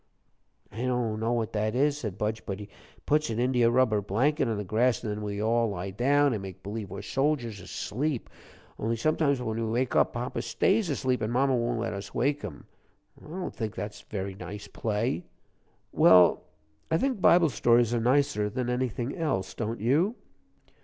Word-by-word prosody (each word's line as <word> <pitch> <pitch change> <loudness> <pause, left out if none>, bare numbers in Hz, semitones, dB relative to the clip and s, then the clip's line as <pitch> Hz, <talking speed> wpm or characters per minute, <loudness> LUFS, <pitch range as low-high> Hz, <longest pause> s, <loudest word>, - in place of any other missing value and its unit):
"I - - -12
don't 125 -4 -1
know 115 +2 0
what 115 -2 -1
that 110 +1 0
is," 145 +2 +3
said 105 -7 -5
Budge, 105 +1 -2
"but 100 -1 -3
he 105 -1 -9 0.4
puts 150 -2 +2
an 110 - -2
India 120 -1 +3
rubber 120 -4 +3
blanket 130 +8 +1
on 110 -2 -1
the 105 - -3
grass, 115 +5 +1
and 110 - -2
then 105 +1 -4
we 100 -1 -4
all 115 +1 +2
lie 95 -1 -4
down 140 +6 +3
an' 105 - -3
make 95 -1 -9
b'lieve 105 0 -5
we're 95 +2 -7
soldiers 130 -3 -1
asleep. 130 +7 -3 0.5
Only 115 +2 0
sometimes 140 +1 +1
when 110 -3 -3
we 115 - -1
wake 120 +2 0
up - - +3
papa 120 -1 -3
stays 180 - +1
asleep, 130 -3 0
an' 110 - -1
mama 130 +2 +2
won't 120 -1 -1
let 115 -2 -2
us 100 0 -7
wake 140 +3 +1
him. 95 -9 -8 0.6
I - - -13
don't 180 +3 -5
think 110 -2 -4
that's 105 0 -6
a - - -27
very 100 -1 -4
nice 100 +2 -8
play." 105 -4 -2 0.7
"Well, 90 -2 +6 0.4
I 160 - +3
think 255 -1 -1
Bible 170 -2 +6
stories 120 -1 +3
are 120 - +1
nicer 125 -4 +2
than 125 +2 -2
anything 125 0 -2
else, 115 - -1
don't 115 0 -3
you?" 150 - +2
115 Hz, 190 wpm, -28 LUFS, 105-130 Hz, 0.7 s, Well